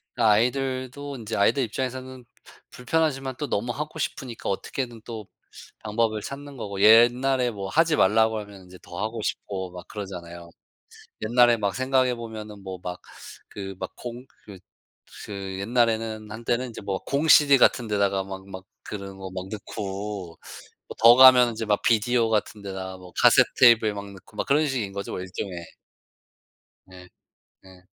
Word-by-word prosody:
그 120 - -2
아이들도 130 +5 0
인제 110 -1 -5
아이들 130 +7 +3
입장에서는 130 +2 -5 0.2
부 - - -16 0.2
불편하지만 135 -1 -1
또 150 - -3
너무 120 +3 -1
하고 150 +3 -6
싶으니까 130 -4 -4
어떻게든 120 +4 -4
또 110 -4 -7 0.6
방법을 110 0 0
찾는 140 +3 -8
거고 100 -4 -6
옛날에 120 +4 +5
뭐 100 -3 -6
하지 160 +6 +2
말라고 110 +2 +3
하면 100 -2 -11
인제 90 0 -14
더 85 - -10
하고 110 0 -3
싶고 95 -3 -4
막 90 -1 -10
그러잖아요. 85 -4 -8 0.9
옛날에 120 -1 +6
막 100 -2 -2
생각해 130 -1 +1
보면은 110 -3 -8
뭐 95 -2 -7
막 90 0 -6 0.5
그 95 -1 -7
막 - - -5
공 120 +1 -8 0.2
그 100 -3 -11 0.7
그 95 -2 -6
옛날에는 110 -1 0
한때는 120 +3 -2
이제 115 - -9
뭐 100 -1 -2
공CD 145 -1 +5
같은 120 -2 +3
데다가 100 -2 +1
막 95 0 -8
막 95 -1 -8 0.2
그런 100 -2 -7
거 95 -1 -7
막 95 0 -6
넣고 100 -3 -6 0.5
뭐 - - -9
더 115 +2 +8
가면은 130 -2 +8
인제 110 0 -5
막 105 -1 +1
비디오 115 +1 +2
같은 105 -1 -1
데다가 95 -1 -6
뭐 90 -1 -13
카세트테이프에 115 -4 +5
막 100 0 -7
넣고 95 - -16
막 - - -1
그런 150 +2 +3
식인 120 -8 -3
거죠 100 0 -5
뭐 - - -4
일종의. 95 +1 -6 1.3
네 90 -1 -14 0.6
네. 95 -1 -17
110 Hz, 320 characters per minute, -25 LUFS, 100-125 Hz, 1.3 s, 더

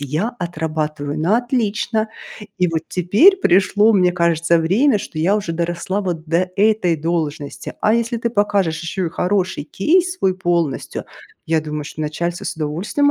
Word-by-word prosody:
я 155 - -2
отрабатываю 155 -3 -3
на 190 +8 +3
отлично. 225 -2 -1 0.5
И 180 - +3
вот 165 -1 -1
теперь 210 - +4
пришло, 205 - +3
мне 180 -3 +4
кажется, 170 -1 +2
время, 210 - +3
что 155 - -6
я 195 +6 +3
уже 195 -5 -3
доросла 175 +4 -2
вот 175 -5 -4
до 175 +3 0
этой 205 -5 +3
должности". 155 -2 -3
А 215 +1 +4
если 235 +1 0
ты 235 - -1
покажешь 200 -6 +1
еще 175 +2 -2
и 160 - -4
хороший 185 -2 -1
кейс 355 - +1
свой 185 -1 +1
полностью, 170 -6 -1 0.4
я 160 -1 +2
думаю, 150 -1 -5
что 155 - -8
начальство 170 +3 -3
с - - -4
удовольствием 170 - 0
175 Hz, 160 wpm, -19 LUFS, 160-210 Hz, 0.5 s, теперь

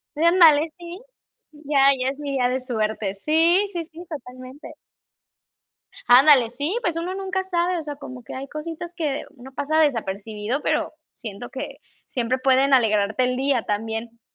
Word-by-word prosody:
Sí, 305 - -1
ándale, 330 -3 +5
sí. 350 +2 -9 0.5
Ya 295 -1 -3 0.2
ya 255 +1 0
es 275 +2 -6
mi 290 -1 -4
día 255 -2 +2
de 260 +1 -2
suerte. 220 -5 -2
Sí, 330 - +3
sí, 335 -2 -4
sí, 335 +3 -11
totalmente. 255 -1 -10 1.3
Ándale, 255 -1 +7
sí, 285 - -2
pues 345 -7 -1
uno 355 +3 -3
nunca 380 -1 -2
sabe, 355 -1 0
o - - -6
sea, 295 -1 -6
como 255 -3 -10
que - - -9
hay 270 +1 -6
cositas 330 +3 -7
que 295 -5 -2
uno 260 +2 -12
pasa 305 +3 -1
desapercibido, 220 -2 -1
pero - - -1 0.2
siento 220 +1 -8
que 265 - -7 0.3
siempre 255 0 -1
pueden 270 +1 +3
alegrarte 220 -1 +3
el 250 0 0
día 265 -3 +1
también. 225 +2 -4
275 Hz, 165 wpm, -23 LUFS, 245-320 Hz, 1.3 s, Ándale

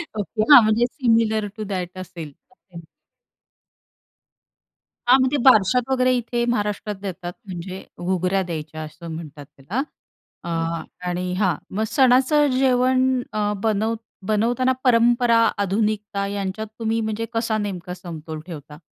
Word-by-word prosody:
Okay, 215 +1 -2
हां, 265 - +11
म्हणजे 220 +3 +3
similar 225 -4 +1
to 215 - -4
that 180 0 -4
असेल, 170 -5 -8 0.2
ओके. 185 -8 -14 2.3
हां, 255 +2 +7
म्हणजे 260 +3 +2
बारशात 240 +1 +5
वगैरे 255 -1 +3
इथे 240 0 -2
महाराष्ट्रात 210 -2 -1
देतात. 180 -2 -5
म्हणजे 185 0 -7 0.2
घुगऱ्या 185 +1 0
द्यायच्या 155 -3 -6
असं 155 +2 -10
म्हणतात 150 -3 -8
त्याला 175 - -4 0.6
अ, - - -8 0.6
आणि 180 +1 -2
हां, 185 -2 +1 0.2
मग 215 - +1
सणाचं 265 +4 +4
जेवण 255 0 +2
अ, 210 -1 0
बनव 220 +1 +1 0.3
बनवताना 235 +4 +2
परंपरा, 240 -1 +4 0.2
आधुनिकता 205 0 -1
यांच्यात 200 +2 -4
तुम्ही 225 0 0
म्हणजे 220 +1 -2
कसा 225 -1 0
नेमका 190 -4 -4
समतोल 160 -3 -8
ठेवता? 150 -3 -9
210 Hz, 125 wpm, -22 LUFS, 180-240 Hz, 2.3 s, हां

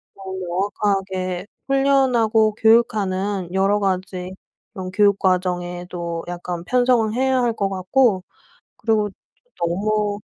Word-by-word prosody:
어 190 -1 -9
명확하게 190 0 -2 0.2
훈련하고 250 -6 +3
교육하는 205 -5 +2
여러 195 +2 +2
가지 185 -1 -2 0.4
그런 185 -1 -6
교육 200 0 +3
과정에도 175 -2 -2
약간 175 -1 -5
편성을 245 -2 +2
해야 260 +1 +2
할 240 -1 +1
것 200 -3 -1
같고 195 +2 +2 0.6
그리고 215 -2 +1 0.5
너무 205 +4 0
195 Hz, 240 characters per minute, -21 LUFS, 185-220 Hz, 0.6 s, 훈련하고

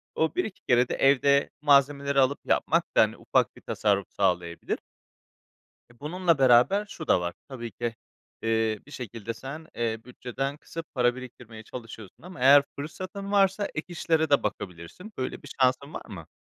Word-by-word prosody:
o, 160 - 0
1-2 220 - -3
kere 125 0 +3
de - - -1
evde, 140 +1 +4
malzemeleri 140 -1 +3
alıp 135 +2 +3
yapmak - - +2
da, - - +9
hani, - - +1
ufak - - +1
bir - - -15
tasarruf 100 -2 0
sağlayabilir. 90 -3 -1 1.1
E, 120 - -27
bununla 170 +2 +1
beraber 135 +11 +5
şu 160 -5 -8
da 90 - +4
var. 85 0 -3
Tabii 120 -5 -7
ki, 120 +2 -3 0.5
eee, 110 -1 +1
bir - - -15
şekilde 115 -4 -6
sen, 150 +5 -8
eee, 115 -1 -1
bütçeden 130 +3 -4
kısıp 165 0 -9
para 120 -1 +3
biriktirmeye 120 -3 -10
çalışıyorsun 115 -3 -10
ama 180 -1 -10
eğer 140 +2 +8
fırsatın 185 +7 -6
varsa 195 0 +3
ek 150 - -3
işlere 160 -2 +1
de 140 - +4
bakabilirsin. 90 - -6
Böyle 130 - -4
bir - - -11
şansın 130 +3 +2
var - - -5
mı? 85 -6 -9
130 Hz, 165 wpm, -27 LUFS, 115-155 Hz, 1.1 s, da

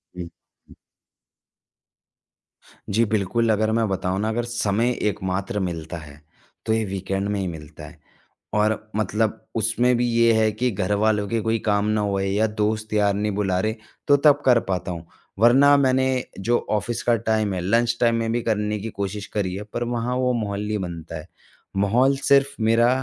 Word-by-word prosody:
हुँ, 90 - -5 0.5
हुँ। - - -16 2.1
जी 115 +4 +2
बिल्कुल, 110 +2 0
अगर 110 +1 +1
मैं 115 0 +1
बताऊँ 95 0 -1
ना 110 +2 0
अगर 120 +2 -1
समय 120 0 0 0.2
एकमात्र 95 +1 -3
मिलता 85 -3 -4
है 75 -2 -12 0.4
तो 110 - +1
ये 110 0 +1
वीकेंड 95 0 -3
में 105 -1 -1
ही 95 - -2
मिलता 80 -3 -9
है। - - -14 0.6
और 110 +1 0
मतलब 110 0 -1
उसमें 115 +3 +2
भी 120 0 +1
ये 115 0 +4
है 110 -1 +3
कि 120 +4 -1
घरवालों 105 +2 0
के 115 +2 -1
कोई 115 +1 0
काम 105 -1 +2
ना 110 0 +1
हो 100 -1 -1
या 100 +3 +1
दोस्त 110 0 -2
यार 105 -1 +3
नहीं 105 +1 -1
बुला 95 -3 0
रहे, 110 +3 -1 0.3
तो 145 - +6
तब 145 0 +4
कर 125 -2 +6
पाता 90 -1 -2
हूँ। 85 -1 -7 0.3
वरना 135 +5 +6
मैंने 130 -1 +2 0.3
जो 120 +5 +2
ऑफ़िस 110 +2 -1
का 120 - +3
टाइम 110 -2 +1
है, 90 - -2
लंच 115 +5 +1
टाइम 115 -1 +4
में 115 -1 -1
भी 120 +1 0
करने 105 -1 -1
की 110 +3 -5
कोशिश 100 0 -4
करी 95 -3 -1
है 100 - -5
पर - - -1
वहाँ 120 +1 -2
वो 125 0 +1
माहौल 105 -3 -2
नहीं 105 0 -1
बनता 85 -3 -6
है। 75 - -10 0.5
माहौल 120 +8 +3
सिर्फ़ 140 0 +3
मेरा 115 +2 +4
110 Hz, 180 wpm, -23 LUFS, 100-115 Hz, 2.1 s, तो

